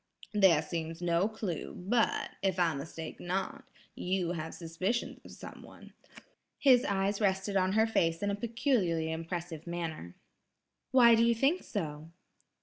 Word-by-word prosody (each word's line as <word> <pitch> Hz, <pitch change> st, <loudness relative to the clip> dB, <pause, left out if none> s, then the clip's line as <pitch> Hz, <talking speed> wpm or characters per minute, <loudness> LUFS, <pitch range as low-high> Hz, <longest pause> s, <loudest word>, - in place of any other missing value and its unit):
There 190 Hz, -7 st, +5 dB
seems 165 Hz, +1 st, -4 dB
no 175 Hz, +2 st, +2 dB
clue; 210 Hz, -7 st, -5 dB
but, 220 Hz, +5 st, 0 dB
if 190 Hz, -2 st, 0 dB
I 170 Hz, -3 st, +2 dB
mistake 160 Hz, +3 st, -7 dB
not, 195 Hz, +10 st, -3 dB, 0.3 s
you 180 Hz, -2 st, -1 dB
have 160 Hz, -2 st, -5 dB
suspicions 185 Hz, +8 st, -3 dB
of -, -, -13 dB
someone." -, -, -12 dB, 0.6 s
His 255 Hz, -3 st, +5 dB
eyes 200 Hz, +1 st, 0 dB
rested 195 Hz, 0 st, 0 dB
on 190 Hz, 0 st, +2 dB
her 220 Hz, +1 st, +4 dB
face 165 Hz, -6 st, 0 dB
in 205 Hz, -, +1 dB
a -, -, -1 dB
peculiarly 205 Hz, -, 0 dB
impressive 165 Hz, 0 st, -5 dB
manner. 165 Hz, -, -5 dB, 0.7 s
"Why 240 Hz, -2 st, +7 dB
do 230 Hz, 0 st, +5 dB
you 235 Hz, 0 st, +3 dB
think 275 Hz, +10 st, +2 dB
so?" 155 Hz, -6 st, -5 dB
185 Hz, 145 wpm, -31 LUFS, 165-220 Hz, 0.7 s, Why